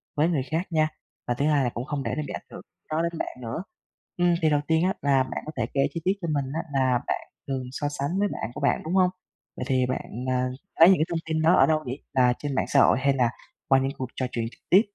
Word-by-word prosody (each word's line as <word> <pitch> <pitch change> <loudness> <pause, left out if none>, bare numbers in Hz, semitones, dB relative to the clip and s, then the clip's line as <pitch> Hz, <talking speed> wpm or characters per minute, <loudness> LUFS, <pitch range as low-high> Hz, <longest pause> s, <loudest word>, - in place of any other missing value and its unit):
với 150 +2 +3
người 150 -7 +1
khác 165 +4 0
nha, 155 -1 +3 0.4
và 120 - +1
thứ 140 +4 -1
2 145 -3 +3
là 125 - +1
cũng 120 +1 -5
không 145 -2 -3
để 115 - -2
nó - - 0
bị - - -6
ảnh - - -6
hưởng - - -8 0.3
đó 155 +1 +1
đến 170 -1 -2
bạn - - -4
nữa. 120 +9 -4 0.5
Ừm, 175 -1 +3
thì 160 - +4
đầu 145 -1 +2
tiên 160 0 +3
á 190 +1 +2
là 135 -2 +3
bạn 130 - -5
có 155 - -5
thể 120 - +1
kể 135 - +2
chi 165 - -4
tiết 190 - +4
cho 170 - -3
mình 140 -2 0
á 165 - -1
là 130 -2 +3
bạn - - 0 0.3
thường 135 -2 -2
so 145 +2 -2
sánh 145 +6 -2
với 205 - +3
bạn 120 - -5
của - - -7
bạn, - - +2
đúng 160 - -3
hông? 185 -1 +5 0.5
Vậy 125 - -3
thì 130 -2 +2
bạn, 125 -1 -4
ờ, - - +2 0.4
lấy 165 +2 +10
những 190 - +6
cái 155 - +2
thông 170 - -1
tin 160 -1 -1
đó 165 +3 +5
ở - - +6
đâu 155 -1 +1
để 130 0 -4 0.2
là 125 -1 +4
trên 145 -2 -3
mạng - - +1
xã - - +3
hội, - - +5
hay 140 +1 +3
là 125 -3 +2 0.4
qua 135 - +5
những 135 +1 0
cuộc 130 - -3
trò 130 - -1
chuyện 115 -1 -2
trực - - -20
tiếp? 190 +3 +7
145 Hz, 290 wpm, -26 LUFS, 130-165 Hz, 0.5 s, lấy